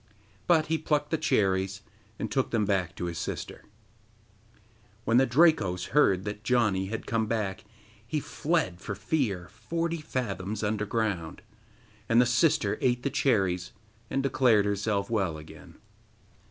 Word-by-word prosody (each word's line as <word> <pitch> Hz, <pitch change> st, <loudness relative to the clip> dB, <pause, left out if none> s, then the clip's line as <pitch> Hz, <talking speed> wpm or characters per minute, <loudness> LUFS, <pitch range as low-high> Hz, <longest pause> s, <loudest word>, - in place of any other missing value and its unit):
But 160 Hz, -3 st, +4 dB
he 160 Hz, +1 st, 0 dB
plucked 150 Hz, -1 st, 0 dB
the 160 Hz, -, +2 dB
cherries, 95 Hz, 0 st, +1 dB, 0.4 s
and -, -, -4 dB
took -, -, +1 dB
them 110 Hz, -3 st, +1 dB
back 95 Hz, -3 st, 0 dB
to 90 Hz, -, -4 dB
his 85 Hz, -1 st, -4 dB
sister. -, -, -5 dB, 1.4 s
When 115 Hz, -, +3 dB
the 130 Hz, +1 st, +5 dB
Drakos 120 Hz, -, +3 dB
heard 100 Hz, -10 st, +3 dB
that 105 Hz, +1 st, -5 dB
Janni 105 Hz, -5 st, +2 dB
had 115 Hz, +1 st, -4 dB
come 115 Hz, -1 st, 0 dB
back, 105 Hz, -4 st, -2 dB, 0.4 s
he -, -, -1 dB
fled 90 Hz, 0 st, -1 dB
for 105 Hz, -, -4 dB
fear 100 Hz, -, -1 dB
forty 165 Hz, +9 st, -3 dB
fathoms 110 Hz, -7 st, -3 dB
underground. 105 Hz, -5 st, -2 dB, 0.7 s
And 115 Hz, -, +5 dB
the 125 Hz, -, +6 dB
sister 125 Hz, +6 st, +2 dB
ate 125 Hz, -1 st, +1 dB
the 140 Hz, -, -1 dB
cherries 95 Hz, -10 st, +1 dB, 0.4 s
and 135 Hz, 0 st, -1 dB
declared 125 Hz, -6 st, +3 dB
herself 100 Hz, 0 st, -1 dB
well 95 Hz, -8 st, 0 dB
again. 75 Hz, 0 st, -13 dB
110 Hz, 140 wpm, -28 LUFS, 95-130 Hz, 1.4 s, the